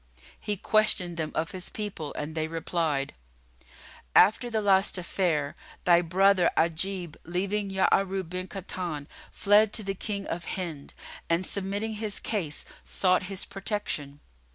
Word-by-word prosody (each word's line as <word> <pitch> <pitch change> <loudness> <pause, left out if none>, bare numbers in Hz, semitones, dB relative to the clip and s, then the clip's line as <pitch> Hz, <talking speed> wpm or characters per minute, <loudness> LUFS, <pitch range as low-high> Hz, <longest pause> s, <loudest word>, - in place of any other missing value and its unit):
He 210 -1 -2
questioned 185 -4 +2
them 155 -2 -2
of 160 +1 -1
his 185 -2 -6
people 200 -8 -4
and 150 +1 -4
they 155 0 -1
replied, 160 -3 -1 1.0
"After 220 +6 +6
the 225 -2 0
last 195 -2 +3
affair, 170 -5 0 0.3
thy 175 -1 +6
brother 185 +1 +4
Ajib, 170 +1 +1
leaving 195 +4 -1
Ya'arub 190 -1 +1
bin 185 +1 -4
Kahtan, 175 -5 -4 0.2
fled 205 +1 +4
to 220 - +1
the 195 0 -2
King 200 0 -3
of 170 0 -4
Hind 165 -7 -5 0.3
and, 170 +2 +2
submitting 200 +4 -2
his 210 -2 -2
case, 170 -9 -2 0.2
sought 185 -1 +2
his 195 -1 -3
protection. 185 -8 -3
185 Hz, 135 wpm, -28 LUFS, 165-200 Hz, 1.0 s, After